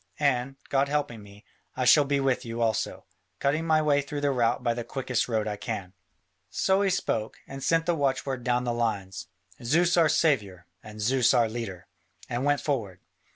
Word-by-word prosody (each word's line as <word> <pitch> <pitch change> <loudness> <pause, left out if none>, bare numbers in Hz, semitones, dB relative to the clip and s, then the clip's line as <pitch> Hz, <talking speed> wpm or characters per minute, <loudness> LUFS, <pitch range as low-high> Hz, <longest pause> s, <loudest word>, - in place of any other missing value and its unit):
And, 135 -2 +1
God 140 0 +2
helping 140 -6 -2
me, 100 0 -15 0.3
I - - 0
shall 150 - +6
be 140 0 +1
with 135 -2 +1
you 115 -1 -6
also, 115 -2 -1 0.3
cutting 150 +7 0
my 155 -1 +3
way 145 -1 +3
through 145 +1 -5
the 145 -1 +2
rout 120 -1 +1
by 120 -1 +1
the 120 0 -4
quickest 125 -1 -2
road 110 -2 0
I 105 -1 -3
can. 95 -2 -5 0.6
So 190 +1 +1
he 200 - +2
spoke, 115 - -1
and 135 0 -8
sent 165 0 +2
the 175 - +2
watchword 135 -3 -1
down 125 0 +1
the 120 -1 -1
lines, 100 -7 -2 0.4
"Zeus 170 +8 +3
our 165 -2 +5
saviour, 105 - +1 0.2
and 105 0 -11
Zeus 125 +3 +3
our 120 -2 +4
leader," 110 -6 -6 0.4
and 120 +1 -2
went 145 -1 +2
forward. 115 -11 -2
125 Hz, 190 wpm, -27 LUFS, 115-145 Hz, 0.6 s, shall